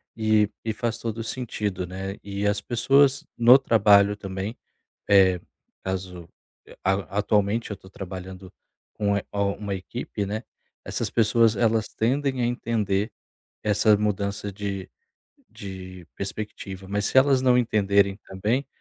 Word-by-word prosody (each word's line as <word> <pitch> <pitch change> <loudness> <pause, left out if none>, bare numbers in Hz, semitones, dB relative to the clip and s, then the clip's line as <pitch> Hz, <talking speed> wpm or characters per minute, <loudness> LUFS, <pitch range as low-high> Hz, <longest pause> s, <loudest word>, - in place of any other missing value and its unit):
e 110 -2 +3
e 110 - -1
faz 115 +1 -2
todo 115 -1 -4
o 115 - -3
sentido, 105 -7 -3
né, 95 +2 -6
e 100 0 -2
as 105 0 0
pessoas 135 +4 +3
no 125 +3 +8
trabalho 105 -4 +5
também, 95 +2 -5 0.5
eh, 95 -3 +5 0.4
caso, 90 -2 -5 0.4
eh, - - -15
a 95 0 -1
atualmente 105 +2 +1
eu 105 - -4
tô 95 - -16
trabalhando 95 0 -8 0.4
com 100 -1 +1
é 100 - -2
a 100 - -3
uma 100 0 -2
equipe, 100 +1 -5
né, 105 +3 -3 0.4
essas - - -3
pessoas 115 0 +3
elas 110 0 +2
tendem 130 +2 0
a - - +2
entender 110 -3 0 0.5
essa 105 0 +4
mudança 100 -1 -2
de 100 -2 -5 0.6
de 95 -2 -9
perspectiva, 95 -1 -6
mas 100 +1 -1
se - - -2
elas 135 -1 +5
não 125 -1 +5
entenderem 100 -4 +2
também, 110 +8 -1
105 Hz, 140 wpm, -25 LUFS, 95-115 Hz, 0.6 s, no